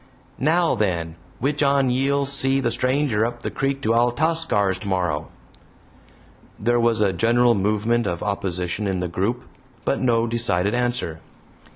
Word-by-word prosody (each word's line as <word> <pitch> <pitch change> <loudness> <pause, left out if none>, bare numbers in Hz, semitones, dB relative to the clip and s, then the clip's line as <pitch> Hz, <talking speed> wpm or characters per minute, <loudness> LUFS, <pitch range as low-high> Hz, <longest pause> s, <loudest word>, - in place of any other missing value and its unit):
"Now, 165 +4 +2
then, 85 -6 -1 0.2
which 145 +4 -1
on 140 -2 +3
ye'll 140 +2 +1
see 135 -1 +1
the 120 -3 0
stranger 125 -2 +1
up 120 +1 -3
the - - -3
creek 135 0 -2
to 115 - +2
Altascar's, 120 - +1
tomorrow?" 90 -6 -2 1.3
There 120 +3 +1
was 115 -2 +2
a 100 -2 +2
general 120 +5 +3
movement 110 +3 0
of 85 -2 -3
opposition 100 -1 -2
in 95 -2 -1
the 90 - -2
group, 100 +8 -2 0.4
but - - 0
no 115 -3 +2
decided 115 -5 0
answer. 120 -10 -1
115 Hz, 145 wpm, -22 LUFS, 100-135 Hz, 1.3 s, on